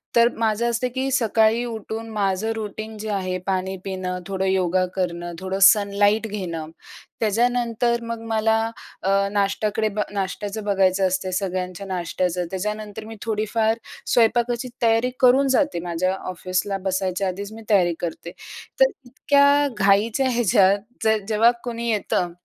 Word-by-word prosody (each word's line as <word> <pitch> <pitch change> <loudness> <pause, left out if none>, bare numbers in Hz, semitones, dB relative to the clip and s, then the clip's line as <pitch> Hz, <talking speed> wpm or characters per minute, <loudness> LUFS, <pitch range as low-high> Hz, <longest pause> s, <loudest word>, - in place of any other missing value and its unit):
तर 235 0 +6
माझं 225 +1 +1
असतं, 235 +2 0
की 265 +1 -1
सकाळी 225 -2 +3
उठून, 225 0 -6
माझं 205 0 -1
रुटीन 215 0 -6
जे 215 +1 -5
आहे 185 -2 -1
पाणी 190 0 -1
पिणं, 185 -2 -4
थोडं 190 -1 -2
योगा 185 -1 +2
करणं, 175 -2 -3
थोडं 190 +1 -3
सनलाइट 205 +2 +4
घेणं, 170 -6 -5 0.5
त्याच्यानंतर 235 +1 +1
मग 230 -1 -5
मला 220 0 +2 0.5
अ, 195 - +1 0.2
नाश्ट्याकडे 210 +2 0
ब - - +1
नाश्ट्याचं 205 +2 -3
बघायचं 195 -1 +2
असते, 185 0 -2
सगळ्यांच्या 185 0 -3
नाश्ट्याचं. 180 -1 -2
त्याच्यानंतर 210 +2 -4
मी 225 0 -9
थोडीफार 220 +1 0 0.4
स्वयंपाकाची 240 +1 +2
तयारी 230 +2 +3
करून 265 +2 +5
जाते, 285 - +1
माझ्या 175 +2 -1
ऑफिसला 185 +2 -2
बसायच्या 190 0 -1
आधीच 200 +3 -5
मी 225 - -10
तयारी 180 -5 +4
करते. 170 0 -5 0.5
तर - - +6 0.2
इतक्या 285 +3 +3
घाईच्या 210 +6 +3
ह्याच्यात 200 -4 +3 0.2
जर 220 0 +3
जेव्हा 225 +2 +4
कोणी 235 -1 -3
येतं, 180 -4 0
210 Hz, 135 wpm, -23 LUFS, 190-225 Hz, 0.5 s, तर